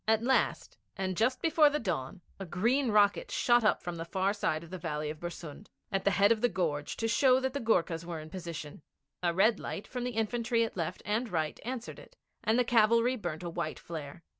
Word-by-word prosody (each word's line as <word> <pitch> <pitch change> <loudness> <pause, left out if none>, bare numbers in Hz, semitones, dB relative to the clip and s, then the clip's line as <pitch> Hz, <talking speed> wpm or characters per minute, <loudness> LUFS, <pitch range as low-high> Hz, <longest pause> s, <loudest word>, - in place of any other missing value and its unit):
At 220 0 +3
last, 265 +2 +1 0.2
and 190 -1 -2
just 250 +6 +1
before 320 -2 +5
the 295 - -1
dawn, 180 - -3 0.2
a 195 - -5
green 235 - +1
rocket 205 -1 +3
shot 240 -1 +3
up 215 - +2
from 175 -1 -4
the 165 - -4
far 190 +3 0
side 160 -6 -1
of 170 - -13
the 185 - -5
valley 150 -3 -3
of 155 - -10
Bersund, 170 +1 -8 0.2
at 195 -1 -1
the - - +5
head 200 +2 +5
of 225 -2 +2
the 245 - +3
gorge, 150 -7 -2
to 225 - -1
show 255 +2 +4
that 265 0 -2
the 285 - -2
Goorkhas 170 - +1
were 170 -1 -5
in 155 0 -10
position. 165 -5 -7 0.4
A 175 -1 +2
red 200 +5 +3
light 200 - -5
from 250 -1 -5
the 245 -2 -3
infantry 230 +1 +1
at 225 - -4
left 165 -4 -3
and 220 +5 -1
right 155 -3 -1
answered 245 0 -5
it, - - -16 0.3
and 220 +2 +2
the 250 - +4
cavalry 235 +1 +4
burnt 175 -8 -5
a 175 - -3
white 165 -2 -3
flare. 160 0 -8
200 Hz, 225 wpm, -31 LUFS, 170-235 Hz, 0.4 s, before